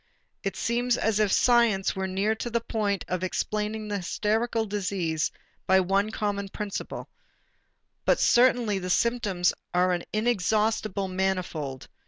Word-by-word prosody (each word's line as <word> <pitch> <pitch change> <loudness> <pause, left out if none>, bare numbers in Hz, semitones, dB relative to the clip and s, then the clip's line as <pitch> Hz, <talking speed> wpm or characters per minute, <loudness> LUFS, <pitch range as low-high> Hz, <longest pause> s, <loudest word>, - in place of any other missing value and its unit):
It - - -3
seems 240 +1 0
as 220 -1 +1
if 210 -2 +2
science 235 -6 +3
were 190 0 -2
near 195 +3 +1
to 220 +2 -4
the 235 0 +1
point 210 -4 -2
of 185 0 -2
explaining 215 +3 -2
the 205 -1 -2
hysterical 220 +5 0
disease 185 -6 -1 0.4
by 190 0 +5
one 195 +3 +1
common 205 -2 -2
principle, 205 0 -5 1.0
but - - +3
certainly 240 -4 +4
the 180 0 -5
symptoms 200 -4 +1 0.2
are 180 +1 +3
an 175 - -1
inexhaustible 215 -2 +1
manifold. 185 -8 -2
205 Hz, 135 wpm, -27 LUFS, 190-220 Hz, 1.0 s, by